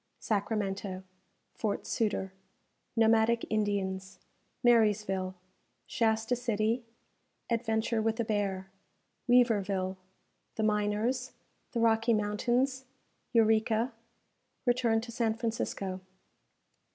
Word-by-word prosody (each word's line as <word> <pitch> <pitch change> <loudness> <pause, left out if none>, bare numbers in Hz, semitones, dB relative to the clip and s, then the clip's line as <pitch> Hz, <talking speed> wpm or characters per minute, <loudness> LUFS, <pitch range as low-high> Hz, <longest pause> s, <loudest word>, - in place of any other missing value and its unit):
Sacramento 200 -3 -2 0.5
Fort 210 -3 -2
Sutter 200 -4 -1 0.6
Nomadic 225 0 +4
Indians 195 -3 -1 0.5
Marysville 210 -5 +3 0.5
Shasta 225 +1 +1
City 230 0 0 0.7
Adventure 225 -1 +1
with 225 +1 0
a - - +2
Bear 195 -3 -2 0.6
Weaverville 200 -6 +3 0.6
The 220 - -1
Miners 215 +4 0 0.4
The 235 - 0
Rocky 225 0 +3
Mountains 245 +6 0 0.5
Eureka 225 +1 +3 0.7
Return 240 -2 +2
to 235 +1 -8
San 225 -2 0
Francisco. 210 -5 -3
220 Hz, 80 wpm, -30 LUFS, 205-230 Hz, 0.7 s, Nomadic